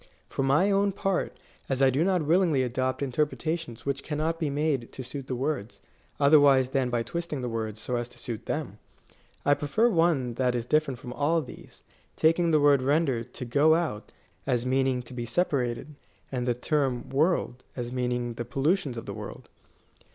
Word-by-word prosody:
For -, -, -2 dB
my 145 Hz, +9 st, +3 dB
own 200 Hz, 0 st, +2 dB
part, 195 Hz, -1 st, -1 dB, 0.3 s
as 135 Hz, -1 st, 0 dB
I 135 Hz, -1 st, +5 dB
do 140 Hz, +5 st, +2 dB
not 180 Hz, -4 st, +1 dB
willingly 165 Hz, -4 st, +3 dB
adopt 130 Hz, +2 st, -1 dB
interpreta 150 Hz, +4 st, 0 dB
tions 120 Hz, -8 st, -10 dB
which 140 Hz, 0 st, -1 dB
cannot 160 Hz, +3 st, -2 dB
be 155 Hz, -3 st, 0 dB
made 140 Hz, -4 st, -1 dB
to 130 Hz, -, -6 dB
suit 130 Hz, +1 st, -7 dB
the 130 Hz, -, -2 dB
words, 125 Hz, -4 st, -3 dB, 0.4 s
otherwise 140 Hz, -3 st, +6 dB
than 130 Hz, -2 st, 0 dB
by 120 Hz, -1 st, 0 dB
twisting 170 Hz, -1 st, -4 dB
the 125 Hz, -, -2 dB
words 110 Hz, -2 st, -3 dB
so 125 Hz, +2 st, -2 dB
as 120 Hz, 0 st, -3 dB
to -, -, -14 dB
suit 115 Hz, -4 st, -6 dB
them, -, -, -3 dB, 0.7 s
I 145 Hz, -, +5 dB
prefer 150 Hz, +12 st, +2 dB
one 165 Hz, -, +2 dB
that 125 Hz, -1 st, +2 dB
is 120 Hz, -1 st, -2 dB
different 145 Hz, -2 st, +1 dB
from 125 Hz, -, -7 dB
all 145 Hz, +6 st, +2 dB
these, 145 Hz, -, -11 dB, 0.3 s
taking 165 Hz, +2 st, +3 dB
the 155 Hz, -2 st, +4 dB
word 145 Hz, -2 st, +5 dB
rendered 135 Hz, -4 st, +1 dB
to 125 Hz, -, -5 dB
go 145 Hz, +6 st, +4 dB
out 160 Hz, -11 st, -2 dB, 0.4 s
as 125 Hz, -2 st, +1 dB
meaning 130 Hz, -1 st, +1 dB
to 120 Hz, -, -12 dB
be 120 Hz, -1 st, -4 dB
separated, 140 Hz, -3 st, -1 dB, 0.4 s
and 125 Hz, -2 st, -2 dB
the 120 Hz, -, +2 dB
term 130 Hz, -1 st, -1 dB
world 135 Hz, -3 st, +1 dB
as 120 Hz, -1 st, -4 dB
mean 125 Hz, -1 st, -1 dB
ing 120 Hz, -1 st, -2 dB
ifAe 120 Hz, +1 st, -6 dB
pollutions 140 Hz, -1 st, 0 dB
of 115 Hz, -, -6 dB
the 100 Hz, -, -5 dB
world. 105 Hz, 0 st, -9 dB
135 Hz, 190 wpm, -27 LUFS, 125-155 Hz, 0.7 s, otherwise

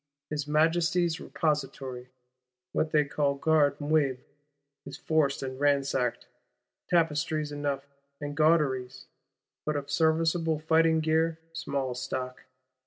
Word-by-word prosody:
His 150 Hz, -1 st, -2 dB
Majesty's 165 Hz, +2 st, +2 dB
Repository, 135 Hz, -5 st, -3 dB, 0.6 s
what 160 Hz, -, 0 dB
they 150 Hz, -1 st, +3 dB
call 140 Hz, 0 st, 0 dB
Garde 145 Hz, -1 st, +2 dB
Meuble, 145 Hz, -3 st, +1 dB, 0.7 s
is -, -, -8 dB
forced 150 Hz, -4 st, +1 dB
and 130 Hz, 0 st, -5 dB
ransacked: 140 Hz, -4 st, +1 dB, 0.6 s
tapestries 155 Hz, -2 st, +1 dB
enough, 145 Hz, -1 st, -2 dB, 0.3 s
and 145 Hz, 0 st, -5 dB
gauderies; 140 Hz, -5 st, +1 dB, 0.6 s
but 150 Hz, -, -1 dB
of 140 Hz, 0 st, -4 dB
serviceable 160 Hz, +1 st, +2 dB
fighting 160 Hz, +1 st, +3 dB
gear 160 Hz, +1 st, +1 dB, 0.2 s
small 140 Hz, -5 st, -2 dB
stock! 125 Hz, +1 st, -5 dB
150 Hz, 105 wpm, -28 LUFS, 140-160 Hz, 0.7 s, they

